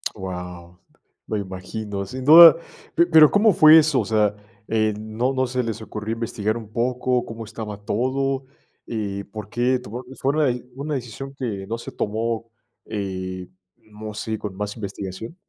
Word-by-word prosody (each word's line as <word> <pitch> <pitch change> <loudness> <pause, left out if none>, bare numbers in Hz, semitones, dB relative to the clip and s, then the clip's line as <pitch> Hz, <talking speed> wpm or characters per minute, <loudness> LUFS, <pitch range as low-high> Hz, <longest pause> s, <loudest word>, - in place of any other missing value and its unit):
Guau, 90 -2 -8 0.5
me 110 - -1
imagino. 100 +1 -5
Sin 130 +6 -7
duda, 165 +2 +11 0.4
pe 170 - +5
pero 160 -3 +7
¿cómo 205 -1 +4
fue 155 0 +8
eso, 155 -4 +4
o - - -4
sea, 105 -2 +2 0.3
eh, 110 -1 +1
no 110 +5 -2
no 130 -1 0
se 125 0 -1
les 115 -1 -4
ocurrió 110 +1 -5
investigar 110 -1 -2
un 110 -2 -10
poco 125 +1 0
cómo 115 0 -7
estaba 110 -2 -7
todo, 135 +5 -1 0.4
eh, 100 -3 -4
por 105 -2 -7
qué 125 +3 +1
tomar 125 +1 -8 0.2
fue 135 +2 +1
una 155 -1 +2
de 125 -1 -1
una 145 +2 -3
decisión 135 +2 -6
que 105 -7 -4
no 115 +1 -3
se - - -8
tomó, 115 +2 -2 0.4
eh, 95 -3 -5 0.3
no 110 0 -10
sé, 110 +1 -4
con 100 -3 -6
más 105 0 -4
investigación? 100 - -7
110 Hz, 165 wpm, -23 LUFS, 105-130 Hz, 0.5 s, duda